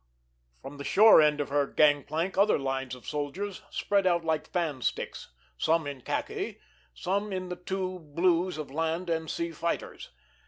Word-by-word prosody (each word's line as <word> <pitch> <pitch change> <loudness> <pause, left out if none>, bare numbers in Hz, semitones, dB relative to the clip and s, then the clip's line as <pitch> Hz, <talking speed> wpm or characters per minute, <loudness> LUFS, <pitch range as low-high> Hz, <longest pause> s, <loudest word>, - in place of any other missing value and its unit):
From 140 +1 -8
the - - -5
shore 215 +2 +7
end 150 -1 +3
of 145 - -2
her 140 0 +1
gang 145 -1 +4
plank 165 +5 -2
other 200 +3 +4
lines 135 -2 -3
of 125 - -15
soldiers 155 +7 -4
spread 200 -2 +1
out 170 -2 +2
like 160 -1 0
fan 160 -7 -1
sticks, - - -3 0.3
some 165 -1 +2
in 140 -2 -6
khaki, 395 - -3 0.4
some 200 +2 -1
in 185 -1 -3
the 180 - -3
two 185 +1 -4
blues 170 +3 +1
of 150 -3 -6
land 165 +3 -1
and 160 -1 -1
sea 170 0 -2
fighters. 165 +1 -4
165 Hz, 170 wpm, -29 LUFS, 145-185 Hz, 0.4 s, shore